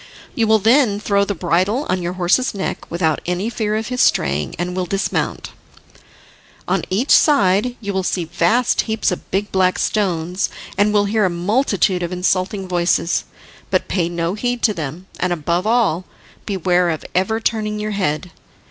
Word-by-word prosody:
You 230 -5 +1
will 220 0 +5
then 220 0 +3
throw 200 -1 +1
the 200 - -3
bridle 185 - 0
on 185 0 0
your 175 +1 -3
horse's 185 +7 +1
neck 195 - -4
without 165 -2 0
any 180 +6 -1
fear 215 -2 -1
of 220 +2 -3
his 250 -1 0
straying, 75 +1 +1
and 175 +2 -3
will 185 -1 -2
dismount. 195 +2 -2 1.2
On - - +1
each 220 +9 0
side 235 -3 +4
you 200 -3 -4
will 190 - 0
see 180 -1 -1
vast 225 +10 +2
heaps 220 -2 +1
of 180 - -6
big 200 +2 -1
black 185 -1 +2
stones, 180 -3 -1 0.3
and 205 +2 +3
will 205 -1 +3
hear 210 0 +1
a - - +2
multitude 190 +1 +1
of 175 0 -3
insulting 185 +2 -1
voices, 175 -1 +1 0.4
but - - 0
pay 170 -3 0
no 170 0 -2
heed 245 +3 -2
to 215 - +4
them, 160 +1 -6
and, 180 - 0
above 175 +3 -1
all, 215 -7 +2 0.4
beware 180 -3 +1
of 160 -2 -3
ever 190 +5 +1
turning 215 -2 -1
your 215 0 -3
head. 180 -3 -2
190 Hz, 175 wpm, -19 LUFS, 175-215 Hz, 1.2 s, will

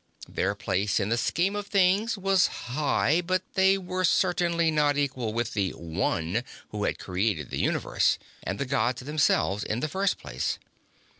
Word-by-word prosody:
Their 100 +2 -1
place 100 +1 0
in 100 0 -1
the 115 - +2
scheme 180 +10 0
of 205 -1 -4
things 200 +3 +2
was 195 -1 +3 0.3
high, 155 +3 +2
but 185 +1 0
they 190 0 +4
were 185 0 -3
certainly 170 -1 +2
not 145 -2 +2
equal 130 -6 -1
with 115 +1 -2
the 100 -3 0
One 85 +4 -2 0.3
who 105 -1 -3
had - - -1
created 90 - -2
the - - -2
Universe - - +1 0.2
and 95 +3 -4
the 135 - -2
Gods 130 -2 0
themselves 145 -8 +1
in 110 - -2
the 155 - -1
first 190 +5 0
place. 65 -3 -3
145 Hz, 165 wpm, -27 LUFS, -, 0.3 s, they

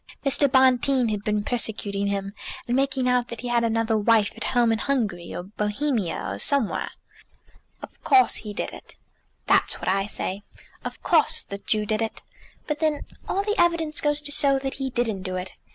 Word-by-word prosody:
Mr. 275 0 +4
Bonteen 260 -1 +4
had 210 -1 -3
been 210 -1 0
persecuting 205 -4 -1
him, 200 0 -3 0.3
and 240 - -1
making 265 -1 +1
out 250 -1 +2
that 235 -2 -7
he 245 - -4
had 240 -1 +2
another 225 0 +1
wife 215 0 +3
at - - -5
home 240 -2 +4
in 225 - 0
Hungary, 215 -12 -1
or 175 - -4
Bohemia, 210 - -2
or 100 +1 -4
somewhere." 275 - +1 0.9
"Of - - -12
course 390 -1 +4
he 210 - -6
did 205 - -4
it." - - -12 0.5
"That's - - +3
what - - -6
I 195 +1 +1
say. 195 -1 -3 0.4
Of - - -7
course 325 -4 +3
the 200 - -7
Jew 215 +1 0
did 215 +1 -1
it. 225 - -4 0.4
But 300 -1 -3
then 310 -2 0 0.3
all 395 - 0
the 420 0 0
evidence 335 -3 +1
goes 295 0 0
to 290 - -1
show 280 -2 +4
that 270 0 -3
he 265 - 0
didn't 235 -6 -1
do 185 -1 -4
it. 185 +1 -5
235 Hz, 190 wpm, -24 LUFS, 205-275 Hz, 0.9 s, Mr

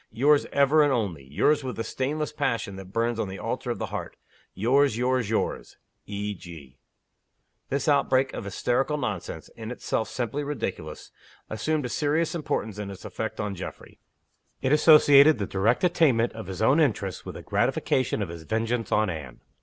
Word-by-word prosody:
Yours 145 +6 +3
ever 140 +2 +4
and 145 -1 +4
only; 100 - -2
yours 145 - +2
with 130 -2 -4
the 115 - -3
stainless 150 +6 -2
passion 120 -9 -2
that 95 -1 -10
burns 115 +1 0
on 105 - -1
the 95 - -6
altar - - -4
of - - -1
the - - -3
heart; - - -5 0.4
yours, 130 +3 +3
yours, 125 -2 0
yours 110 - -2 0.3
E. 105 0 -3
G." 80 -8 -12 0.9
This 140 +2 -1
outbreak 135 -2 +3
of - - -5
hysterical 125 +8 0
nonsense 100 - -4
in 110 -1 -9
itself 120 -2 -2
simply 130 +2 -3
ridiculous 110 - -5 0.4
assumed 145 +7 -1
a - - -3
serious 150 +5 0
importance 110 - -3
in 105 -1 -4
its 100 - -10
effect 110 -1 -5
on 105 -2 -2
Geoffrey. 95 - -9 0.6
It 130 - 0
associated 150 -1 +7
the 100 - -2
direct 105 - +1
attainment 145 -10 +3
of 110 -4 -8
his 95 +2 -4
own 130 +8 +4
interests 105 - 0
with - - -8
the - - -8
gratification 130 -5 0
of 95 - -6
his 85 -1 -8
vengeance 115 +6 -2
on 105 0 +3
Anne. 75 -7 -8
115 Hz, 175 wpm, -26 LUFS, 100-140 Hz, 0.9 s, associated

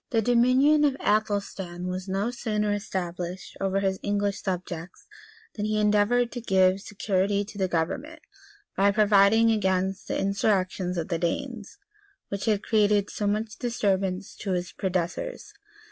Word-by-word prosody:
] - - -60
The 230 - +2
dominion 255 +6 +4
of 280 -2 +2
Athelstan 200 -4 -1
was 185 +1 -4
no 195 +5 -1
sooner 210 -4 -1
established 180 -2 -4
over 195 0 +1
his 190 -1 0
English 205 -1 -1
subjects, 180 -2 -5 0.5
than 210 - -3
he 215 0 0
endeavored 210 +3 +3
to 245 - -5
give 190 -2 +3
security 200 0 0
to 205 0 -11
the 190 - +2
government, 180 - -2 0.6
by 200 +1 +4
providing 210 +2 +5
against 190 -2 0
the - - -1
insurrections 190 -2 0
of 165 +1 -3
the 170 -2 -1
Danes, 225 - -3 0.5
which 200 0 -4
had 210 -2 +1
created 210 -2 +2
so 205 - -2
much 215 +2 -2
disturbance 195 -5 -1
to 195 -3 -3
his 180 0 -2
predecessors. 185 - -3
200 Hz, 145 wpm, -26 LUFS, 185-215 Hz, 0.6 s, providing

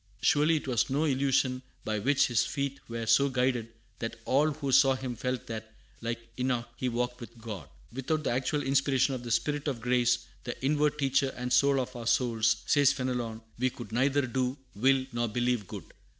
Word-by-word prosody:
Surely 150 +3 +3
it 150 - -3
was 120 -3 +1
no 140 +4 +1
illusion 135 -3 +1 0.2
by 110 -1 -1
which 145 +6 +3
his 120 -2 +2
feet 140 -1 -3
were 115 0 -4
so 140 +5 +4
guided 125 -3 0 0.3
that 115 0 -4
all 145 +4 +3
who 140 -2 -3
saw 135 0 +6
him 130 -2 -4
felt 125 +2 -3
that, 110 -1 -6 0.3
like 115 0 -4
Enoch, 125 -2 0
he 125 - -2
walked 125 +1 -2
with 120 0 -10
God. 105 - -7 0.2
"Without 150 +4 -1
the - - 0
actual 135 +4 0
inspiration 135 0 +2
of 130 - -4
the 120 - -7
Spirit 145 +5 0
of 135 -5 -2
Grace, 120 0 +2 0.2
the 120 - -5
inward 150 +1 +2
teacher 135 -1 +2
and 125 0 -2
soul 140 -1 +4
of 130 0 -4
our 115 -1 -6
souls," 110 -2 +2
says 145 -1 +5
Fenelon, 125 -4 -3 0.2
"we 130 +1 +2
could 120 -2 -10
neither 135 +4 +2
do, 130 +1 -1 0.2
will, 130 +4 +3
nor 120 0 0
believe 120 -2 0
good. - - -7
125 Hz, 195 wpm, -29 LUFS, 120-135 Hz, 0.3 s, saw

